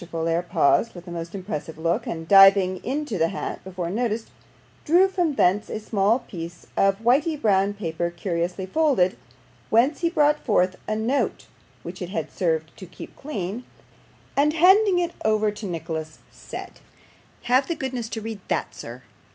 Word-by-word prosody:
Folair 165 0 0
paused 175 +6 +2
with 175 +1 -11
a - - -7
most 170 +2 -6
impressive 175 -5 -5
look, 165 +2 -1
and 165 -1 -5
diving 195 -1 +6
into 270 - -3
the 165 - +3
hat 195 - -5
before 180 -2 -5
noticed, 225 +1 -2 0.5
drew 355 +5 +5
from 355 -6 -1
thence 195 +1 +2
a - - -4
small 215 +1 +1
piece 170 -8 -9
of 195 0 +3
whity 285 +6 +3
brown 200 -4 +2
paper 170 -3 -3
curiously 175 +1 -3
folded, 245 - +2 0.5
whence 250 +7 +3
he 340 - +2
brought 300 -2 +3
forth 185 -5 +2
a 215 - -1
note 230 +6 -1 0.4
which 180 +3 -8
it 180 - -4
had 165 -5 -4
served 160 -3 -1
to 190 - -10
keep - - -11
clean, 220 -5 -5 0.7
and 295 +2 +3
handing 380 +4 +5
it 350 -1 0
over 215 -1 +2
to 210 0 -7
Nicholas, 160 -2 -5
said - - -9 0.6
'Have 255 +3 +2
the 335 - -2
goodness 255 -5 -4
to 225 - -5
read 220 -1 -6
that, - - -2
sir. 120 +2 -9
200 Hz, 165 wpm, -24 LUFS, 175-255 Hz, 0.7 s, diving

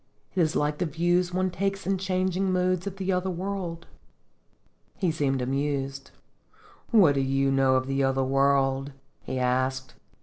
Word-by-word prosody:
It 185 - +1
is 160 -2 +1
like 150 0 0
the 180 - 0
views 175 +3 +1
one 185 +1 0
takes 195 +1 -2
in 195 0 0
changing 185 0 0
moods 185 0 0
of 195 - -4
the 195 0 -2
other 180 +1 -1
world." 180 -2 -4 1.1
He 180 -4 0
seemed 135 -4 0
amused. 135 +1 -2 0.8
"What 195 - +6
do 140 - 0
you 135 0 +1
know 135 -1 +3
of 130 0 +1
the 135 +1 0
other 135 0 +1
world?" 135 0 +1 0.3
he 130 - -5
asked. 130 +1 -1
150 Hz, 160 wpm, -26 LUFS, 135-185 Hz, 1.1 s, What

